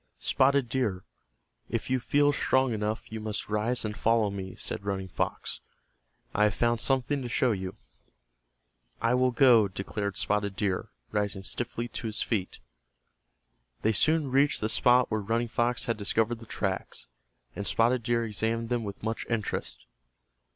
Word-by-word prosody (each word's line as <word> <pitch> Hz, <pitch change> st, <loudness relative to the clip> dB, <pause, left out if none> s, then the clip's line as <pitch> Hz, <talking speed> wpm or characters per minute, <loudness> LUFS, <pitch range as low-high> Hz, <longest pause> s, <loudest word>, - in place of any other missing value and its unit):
"Spotted 135 Hz, -1 st, +3 dB
Deer, 115 Hz, -7 st, -1 dB, 0.7 s
if 115 Hz, -, -2 dB
you 130 Hz, 0 st, +1 dB
feel 145 Hz, +3 st, +3 dB
strong 130 Hz, -3 st, +2 dB
enough 110 Hz, +1 st, -3 dB
you 110 Hz, -, -4 dB
must 105 Hz, -1 st, -4 dB
rise 110 Hz, +3 st, 0 dB
and 105 Hz, 0 st, -3 dB
follow 110 Hz, -2 st, +2 dB
me," 95 Hz, -2 st, -6 dB
said -, -, -4 dB
Running 95 Hz, -2 st, -3 dB
Fox. -, -, -2 dB, 0.7 s
"I 105 Hz, -, +4 dB
have 105 Hz, -, +1 dB
found 120 Hz, -1 st, +1 dB
something 135 Hz, +2 st, +1 dB
to 125 Hz, -, -4 dB
show 125 Hz, +1 st, +2 dB
you." 95 Hz, -3 st, -3 dB, 1.2 s
"I 115 Hz, +1 st, +2 dB
will 130 Hz, 0 st, +4 dB
go," 120 Hz, -4 st, +6 dB
declared 100 Hz, +1 st, -4 dB
Spotted 100 Hz, -1 st, 0 dB
Deer, 95 Hz, -3 st, -1 dB, 0.2 s
rising 105 Hz, -2 st, -1 dB
stiffly 120 Hz, +3 st, -3 dB
to 115 Hz, -, -5 dB
his 110 Hz, -, -1 dB
feet. 100 Hz, -6 st, -2 dB, 1.3 s
They 110 Hz, -, +3 dB
soon 155 Hz, +5 st, +2 dB
reached 140 Hz, +2 st, +3 dB
the 110 Hz, -, -1 dB
spot 125 Hz, +2 st, +4 dB
where 110 Hz, 0 st, 0 dB
Running 115 Hz, +4 st, 0 dB
Fox 120 Hz, +1 st, 0 dB
had 115 Hz, -, -1 dB
discovered 115 Hz, +3 st, 0 dB
the 115 Hz, -, -12 dB
tracks, 95 Hz, -3 st, -2 dB, 0.5 s
and 100 Hz, -, -3 dB
Spotted 120 Hz, +2 st, +3 dB
Deer 115 Hz, 0 st, +1 dB
examined 115 Hz, +1 st, -1 dB
them 120 Hz, -2 st, 0 dB
with 100 Hz, -1 st, -7 dB
much 110 Hz, +1 st, -3 dB
interest. 115 Hz, -3 st, -3 dB
115 Hz, 160 wpm, -28 LUFS, 105-125 Hz, 1.3 s, go